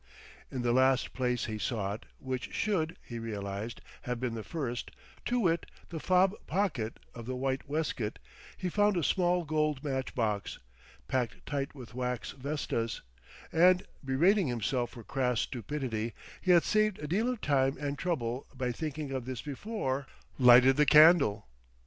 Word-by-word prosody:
In 125 -2 -4
the 120 -1 +2
last 130 +1 +3
place 125 -2 0
he 110 -1 -4
sought, 105 -2 -3
which 130 -1 -4
should 180 -4 0
(he 120 -1 -7
realized) 105 0 -5 0.2
have 125 -1 -3
been 125 -2 -2
the 110 -1 -5
first, 125 -6 -4 0.4
to 245 0 +1
wit, 170 -4 +1 0.2
the 165 - -5
fob 185 +3 +3
pocket 155 - -1 0.2
of 120 -1 -9
the 130 - -2
white 135 +1 -2
waistcoat, 145 -8 -2 0.4
he 185 - -3
found 205 +1 +2
a 170 - 0
small 180 0 +2
gold 150 -2 0
matchbox, 125 -7 -2 0.5
packed 125 -3 -2
tight 140 0 -3
with 125 -3 -10
wax 125 -1 -3
vestas; 135 -4 -3 0.5
and, 180 +3 +5 0.2
berating 170 +8 +3
himself 120 0 -1
for 120 -2 -11
crass 125 -1 0
stupidity 120 -3 -3 0.3
he 185 - -4
had 175 -2 +7
saved 215 -2 +2
a 150 - -6
deal 210 +10 +1
of 250 -3 -2
time 135 -4 +2
and 145 -1 -3
trouble 130 -7 -2
by 125 -1 -1
thinking 150 +2 -4
of 130 -3 -3
this 130 -3 -5
before 140 - -3 0.3
lighted 125 +1 +8
the 150 - +5
candle. 150 - +7
135 Hz, 155 wpm, -31 LUFS, 120-160 Hz, 0.5 s, lighted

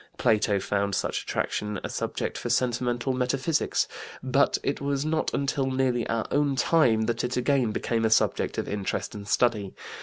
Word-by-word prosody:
Plato 105 -4 +2
found 100 0 -1
such - - -1
attraction 105 -2 -2
a - - -3
subject - - -3
for 120 - -4
sentimental 120 +1 0
metaphysics, 130 +5 0 0.4
but 135 +2 +3
it 140 - -1
was 140 0 -1
not 155 0 0
until 140 -1 0
nearly 130 -2 0
our 115 -1 0
own 145 -1 +2
time 125 -5 +3
that 115 +1 -1
it 125 +1 -1
again 125 -1 +2
became 115 +1 -1
a 110 - +3
subject 110 - +2
of - - -2
interest 100 -1 -3
and 105 -1 -8
study. 105 -4 +1
120 Hz, 170 wpm, -27 LUFS, 110-135 Hz, 0.4 s, but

